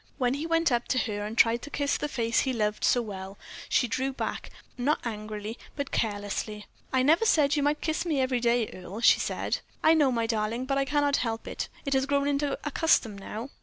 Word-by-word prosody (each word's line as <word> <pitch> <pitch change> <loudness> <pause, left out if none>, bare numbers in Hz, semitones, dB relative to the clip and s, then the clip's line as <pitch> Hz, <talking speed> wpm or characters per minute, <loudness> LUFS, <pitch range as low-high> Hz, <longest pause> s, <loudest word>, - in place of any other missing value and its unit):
When 250 -2 +1
he 295 +4 -3
went 330 -2 +2
up 240 0 0
to - - 0
her 210 -4 -1
and 220 +2 -7
tried 230 0 +4
to 290 - -8
kiss 285 -1 0
the - - -2
face 235 -5 0
he 265 - 0
loved 210 -2 -1
so 245 - +3
well, 195 -2 -7 0.3
she 245 - +3
drew 260 +4 -1
back, 265 - -4 0.3
not 275 +5 +1
angrily, 215 0 -5 0.2
but 280 -2 -4
carelessly. 210 0 -2 0.3
"I 260 -1 +2
never 320 +9 +4
said 300 -9 +3
you 290 - +1
might 290 +1 +1
kiss 315 -1 -1
me 315 -5 0
every 255 -1 +1
day, 235 -1 +2
Earle," 190 +4 -8
she - - +6
said. - - -2 0.2
"I 315 - +6
know, 295 -5 +4
my 230 -2 0
darling, 225 +2 -1
but 275 +1 0
I 275 - +1
cannot 290 0 +2
help 225 -2 -3
it. - - -4 0.2
It 275 - 0
has 265 0 +2
grown 280 0 +1
into 285 0 0
a 295 - -3
custom 260 -10 +2
now." 215 +6 -7
255 Hz, 225 wpm, -28 LUFS, 225-285 Hz, 0.3 s, she